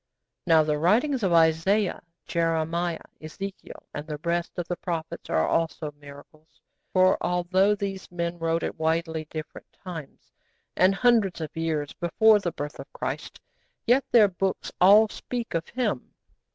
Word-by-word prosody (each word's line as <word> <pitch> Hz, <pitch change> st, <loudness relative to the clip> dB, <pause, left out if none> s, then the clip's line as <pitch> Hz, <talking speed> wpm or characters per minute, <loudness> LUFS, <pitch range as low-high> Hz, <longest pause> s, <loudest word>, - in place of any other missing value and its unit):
Now 160 Hz, -2 st, +6 dB
the 150 Hz, -1 st, -1 dB
writings 240 Hz, -, +2 dB
of 190 Hz, -4 st, +1 dB
Isaiah, 170 Hz, +5 st, +3 dB, 0.2 s
Jeremiah, 165 Hz, 0 st, -1 dB, 0.2 s
Ezekiel, 195 Hz, +5 st, -8 dB
and 145 Hz, +1 st, -6 dB
the 150 Hz, -1 st, -5 dB
rest 170 Hz, 0 st, -1 dB
of 175 Hz, -1 st, -3 dB
the 175 Hz, -, -2 dB
prophets 170 Hz, -1 st, -5 dB
are 80 Hz, 0 st, +2 dB
also 160 Hz, -2 st, -1 dB
miracles, 145 Hz, +2 st, -15 dB, 0.3 s
for 185 Hz, 0 st, +4 dB
although 185 Hz, +3 st, +2 dB
these 195 Hz, -1 st, -5 dB
men 170 Hz, 0 st, -3 dB
wrote 165 Hz, 0 st, 0 dB
at -, -, -4 dB
widely 160 Hz, 0 st, -1 dB
different 155 Hz, 0 st, -9 dB
times, 165 Hz, -7 st, -10 dB, 0.4 s
and 190 Hz, +2 st, +4 dB
hundreds 225 Hz, -6 st, +3 dB
of 155 Hz, -2 st, -6 dB
years 160 Hz, -3 st, -2 dB
before 210 Hz, +5 st, +4 dB
the 175 Hz, -4 st, -2 dB
birth 145 Hz, -2 st, -6 dB
of -, -, -10 dB
Christ, -, -, -5 dB, 0.5 s
yet 250 Hz, +3 st, +4 dB
their 220 Hz, -4 st, +6 dB
books 190 Hz, +1 st, -2 dB
all 205 Hz, +4 st, +7 dB
speak 235 Hz, +2 st, -5 dB
of 165 Hz, -1 st, -2 dB
Him. 230 Hz, -, -2 dB
170 Hz, 150 wpm, -26 LUFS, 160-195 Hz, 0.5 s, all